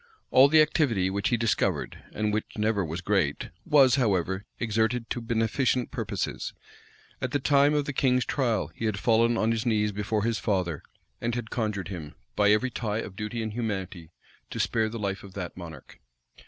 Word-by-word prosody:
All 130 +2 +8
the 155 +1 +6
activity 115 - +1
which 100 +1 0
he 120 - +2
discovered, 115 -1 0
and 105 0 -1
which 110 +1 -3
never 105 -2 +1
was 85 +1 -4
great, 85 -7 0 0.2
was, 140 -3 +6
however, 95 -4 0
exerted 115 +1 0
to 120 - -2
beneficent 115 +2 0
purposes: - - -3 0.7
at 130 - -1
the 145 - +2
time 145 +2 +4
of 145 -1 +1
the 145 - -3
king's 125 -1 +2
trial, 120 -6 0
he 115 - -5
had 110 -2 0
fallen 115 +2 +3
on 110 +1 +2
his 115 -1 -1
knees 105 -3 +1
before 105 +1 -1
his 115 -1 0
father, 90 -7 -1 0.4
and 120 0 -1
had 120 -3 -5
conjured 105 -6 -2
him, 80 -6 -7 0.2
by 105 0 +4
every 110 +5 +3
tie 110 -3 -2
of 105 -4 -5
duty 110 +3 -4
and 110 -1 -4
humanity, 95 -7 -4 0.4
to - - -6
spare 110 -1 +1
the 115 - -6
life 100 -2 -3
of 95 -1 -12
that 90 -3 -5
monarch. 85 -3 -10
110 Hz, 185 wpm, -27 LUFS, 100-120 Hz, 0.7 s, All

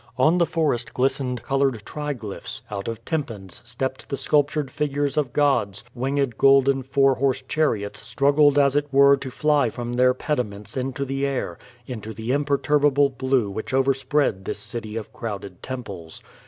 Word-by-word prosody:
On 155 +7 +4
the 170 - +3
forest 145 -7 -1
glistened 130 -1 0
colored 135 -5 0
triglyphs; 140 -9 -5
out 100 -1 -4
of 115 0 -5
tympans 115 - -4
stepped 130 0 -4
the 140 - -2
sculptured 145 -1 +1
figures 145 -1 -1
of 145 -5 0
gods, 120 -10 +1
winged 135 -1 -1
golden 135 0 +5
four 135 +1 +3
horse 130 +1 0
chariots 110 -10 0
struggled 140 +6 +3
as 140 -1 +4
it 145 0 +1
were 140 +1 +7
to 135 - -6
fly 145 -1 +2
from 120 +2 -5
their 125 +1 +4
pediments 105 -8 -3
into 135 +1 -2
the 135 +1 -3
air 135 -11 -2
— 120 0 -29
into 110 -3 -7
the 115 +2 -3
imperturbable 145 0 +2
blue 130 -3 0
which 110 +6 -4
overspread 135 -5 +1
this - - -4
city 110 +1 -5
of 110 - -7
crowded 100 -5 -6
temples. 100 -11 -7
135 Hz, 160 wpm, -23 LUFS, 115-140 Hz, -, were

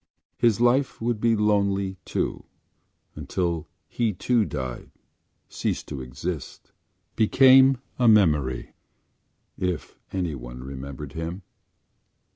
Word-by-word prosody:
His 115 -3 +2
life 125 +3 +2
would 115 -1 -1
be 115 -1 +3
lonely 100 -2 +1
too - - -2 0.7
until 85 -3 -2 0.2
he, 115 -3 -1
too, 115 +4 +1
died, 65 -7 -5 0.6
ceased - - -3
to 70 -3 -5
exist, 65 +5 -6 0.4
became 130 +4 +6 0.2
a 125 - +4
memory—if 80 - -1
anyone 65 -9 -4
remembered 70 +1 -7
him. 85 +4 -5
95 Hz, 90 wpm, -25 LUFS, 70-115 Hz, 0.7 s, became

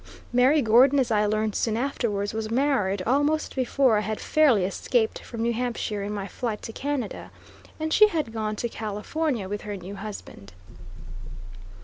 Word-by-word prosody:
Mary 260 +4 +4
Gordon, 250 +5 +5
as 255 -3 +1
I 210 -1 +3
learned 215 0 0
soon 220 -1 0
afterwards, 225 -6 -2
was 220 0 -3
married 230 -7 +1
almost 290 +5 +1
before 260 -2 +2
I - - -1
had 215 +1 -3
fairly 265 -12 +3
escaped 220 +4 0
from 230 -2 -6
New 235 0 +1
Hampshire 230 -3 -2
in 200 +1 -4
my 200 -2 -4
flight 220 +1 -4
to 225 - -6
Canada, 275 -5 -4 0.5
and 315 0 -1
she 425 - +7
had 310 - -3
gone 215 -1 -2
to 235 - -2
California 225 +3 -3
with 205 +1 -4
her 205 -1 -5
new 185 +2 -8
husband. 195 - -9
225 Hz, 165 wpm, -25 LUFS, 210-265 Hz, 0.5 s, she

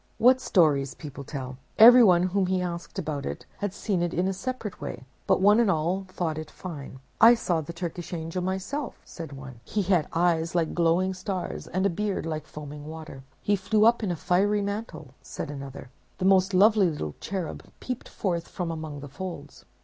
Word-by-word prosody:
What 255 +2 +5
stories 145 - +2
people 145 -2 -8
tell! 130 -2 -6 0.2
Everyone 225 -6 +8
whom 185 +1 +1
he 185 0 +1
asked 175 -1 -5
about 145 -2 -3
it - - -5
had 205 -1 -1
seen 200 -2 -1
it 175 0 -1
in 180 +2 +1
a 195 - 0
separate 230 +1 -5
way; - - -6 0.2
but - - +3
one 205 +3 +6
and 235 -4 +4
all 180 +3 0
thought 165 -4 -3
it 155 - -7
fine. 145 -7 -8 0.2
"I 235 +1 +10
saw 175 -8 0
the 155 - -7
Turkish 170 0 -6
angel 165 +1 -3
himself," 225 +9 -4
said 165 -4 -8
one. 135 -3 -10
"He 205 - -1
had 180 -4 +2
eyes 165 -1 +1
like 165 -2 +1
glowing 175 +3 +2
stars, 185 -1 -4
and 185 +2 -1
a - - +4
beard 200 0 -2
like 155 -2 -4
foaming 150 0 -9
water." 155 -4 -8 0.2
"He 205 - +3
flew 210 +3 +2
up 235 +1 +5
in 210 - -1
a 175 - 0
fiery 200 +5 +2
mantle," 200 - -5
said - - -6
another; 135 -2 -8 0.3
"the 185 - -2
most 190 0 +4
lovely 205 -1 +5
little 75 - -4
cherub 185 -5 -4 0.2
peeped 250 -1 -5
forth 170 -4 -2
from 175 -2 -4
among 155 -3 -6
the 145 - -7
folds." 150 -1 -8
175 Hz, 195 wpm, -27 LUFS, 155-195 Hz, 0.3 s, I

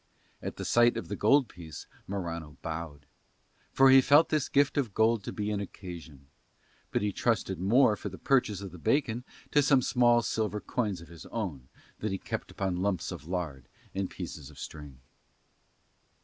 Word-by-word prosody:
At - - -5
the - - -5
sight 120 0 +4
of 115 - -5
the - - -2
gold 140 -3 +4
piece 80 -6 -10 0.2
Morano 85 -7 -5
bowed, 80 -3 -5 0.7
for 135 0 +6
he 135 0 +9
felt 145 +5 +5
this 155 -3 0
gift 140 0 +3
of 125 -9 -1
gold 110 -1 +3
to - - -4
be 105 0 -2
an 105 - -1
occasion; 85 -8 -9 0.6
but - - 0
he 105 - +1
trusted 100 -4 0
more 110 +4 +4
for 100 - -6
the 95 - -9
purchase 115 -8 +1
of 100 -2 -7
the 90 - -11
bacon 120 - +1 0.3
to 145 - +5
some 135 -2 +4
few - - -2
small 120 -2 +4
silver 105 -2 -1
coins 105 -6 -2
of 85 - -12
his 85 -1 -11
own 80 - -5 0.3
that 110 - -2
he 95 - -1
kept - - -5
among 95 -2 0
lumps 95 -1 -1
of 75 - -8
lard 80 -8 -4 0.2
and 95 -1 -2
pieces 80 -6 -7
of - - -16
string. 75 -4 -9
100 Hz, 185 wpm, -29 LUFS, 85-120 Hz, 0.7 s, he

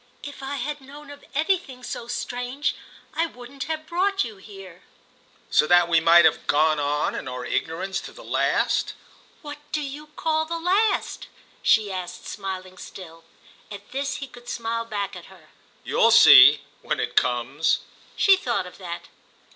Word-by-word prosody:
"If 285 -1 -9
I 270 +1 -4
had 290 +2 -4
known 285 +2 -12
of 285 - -13
anything 310 -5 -1
so 235 - -6
strange 245 +3 -3 0.4
I 330 +2 0
wouldn't 255 0 -9
have 315 -1 -4
brought 380 +4 0
you 220 -4 -8
here." 195 -3 -13 0.7
"So 150 - +4
that 175 0 +5
we 165 -1 +4
might 170 +1 +6
have - - +2
gone 155 +1 +3
on 145 +1 0
in - - -6
our 125 -1 -5
ignorance 180 +9 -2
to - - -9
the - - -13
last?" - - 0 0.5
"What 295 0 -8
do 305 - 0
you 295 +1 -7
call 315 +1 -1
the 335 +1 -3
last?" 380 +6 0 0.3
she 215 -3 +3
asked, 180 -1 -6
smiling 185 -2 -6
still. 165 -3 -11 0.4
At 205 +2 -11
this 275 +2 -2
he 290 -2 -5
could 245 -1 -13
smile 230 0 -3
back 200 -3 -4
at 175 - -10
her. 175 -5 -18 0.3
"You'll - - +3
see—when - - +6
it - - -3
comes." 125 +5 +1 0.3
She 390 - +5
thought 235 - -2
of 180 - -12
that. 175 -2 -7
230 Hz, 165 wpm, -24 LUFS, 175-290 Hz, 0.7 s, might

